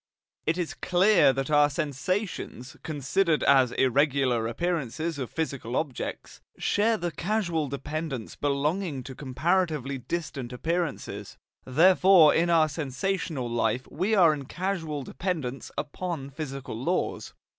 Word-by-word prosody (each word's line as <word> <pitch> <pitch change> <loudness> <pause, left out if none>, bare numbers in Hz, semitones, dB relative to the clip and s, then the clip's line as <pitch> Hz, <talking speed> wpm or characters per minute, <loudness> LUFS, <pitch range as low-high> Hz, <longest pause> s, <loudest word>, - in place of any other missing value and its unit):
It 160 +2 +2
is 175 -3 -2
clear 180 -3 +4
that 135 +2 -3
our 145 0 +5
sensations, 150 - -3
considered 155 +3 0
as 130 -3 +5
irregular 130 -3 +2
appearances 160 +2 -2
of 130 - -3
physical 140 -6 -3
objects, 140 -4 -4 0.2
share 220 +2 +2
the 175 -3 -3
causal 170 -2 -1
dependence 140 -2 -5
belonging 145 +1 -1
to 130 - -8
comparatively 145 0 -1
distant 135 -3 -4
appearances; 140 - -3 0.3
therefore 175 +3 +6
in 170 +1 +2
our 165 -2 +5
sensational 155 -1 -2
life 120 +1 0
we 190 +8 +1
are 170 -6 +6
in 140 -2 -6
causal 160 -4 -3
dependence 140 -5 -4
upon 155 -4 -4
physical 135 -4 -6
laws. 175 +7 -2
150 Hz, 120 wpm, -27 LUFS, 135-175 Hz, 0.3 s, therefore